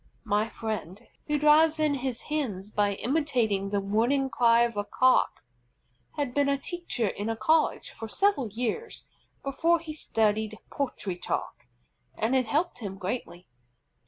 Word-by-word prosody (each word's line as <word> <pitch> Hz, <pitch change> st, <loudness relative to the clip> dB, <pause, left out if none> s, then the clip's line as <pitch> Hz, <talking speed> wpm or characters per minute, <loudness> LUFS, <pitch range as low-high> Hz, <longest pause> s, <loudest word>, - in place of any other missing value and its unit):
My 210 Hz, +2 st, +1 dB
friend, 210 Hz, -5 st, -5 dB, 0.3 s
who 295 Hz, -, +1 dB
drives 305 Hz, +2 st, +5 dB
in 305 Hz, -2 st, +2 dB
his 260 Hz, -3 st, -3 dB
Hens 215 Hz, -10 st, -3 dB
by 205 Hz, -1 st, +1 dB
imitating 240 Hz, -7 st, 0 dB
the 200 Hz, 0 st, 0 dB
warning 235 Hz, +7 st, +1 dB
cry 235 Hz, -1 st, +5 dB
of 235 Hz, -2 st, -1 dB
a 205 Hz, -, -1 dB
Cock, 255 Hz, +5 st, +2 dB, 0.7 s
had 285 Hz, -5 st, -2 dB
been 285 Hz, 0 st, +2 dB
a 280 Hz, -, +2 dB
teacher 340 Hz, -, -3 dB
in 205 Hz, +3 st, -4 dB
a 225 Hz, -, 0 dB
college 310 Hz, +8 st, +1 dB
for 225 Hz, -, -8 dB
several 390 Hz, -, +2 dB
years 245 Hz, -, -4 dB, 0.4 s
before 330 Hz, +5 st, +2 dB
he 320 Hz, -1 st, -7 dB
studied 220 Hz, -6 st, 0 dB
poultry 245 Hz, -9 st, -3 dB
talk, 125 Hz, -7 st, -4 dB, 0.5 s
and 225 Hz, +4 st, +1 dB
it 255 Hz, -3 st, +2 dB
helped 310 Hz, +5 st, 0 dB
him 195 Hz, -4 st, -6 dB
greatly. 185 Hz, -2 st, -5 dB
240 Hz, 150 wpm, -28 LUFS, 210-290 Hz, 0.7 s, drives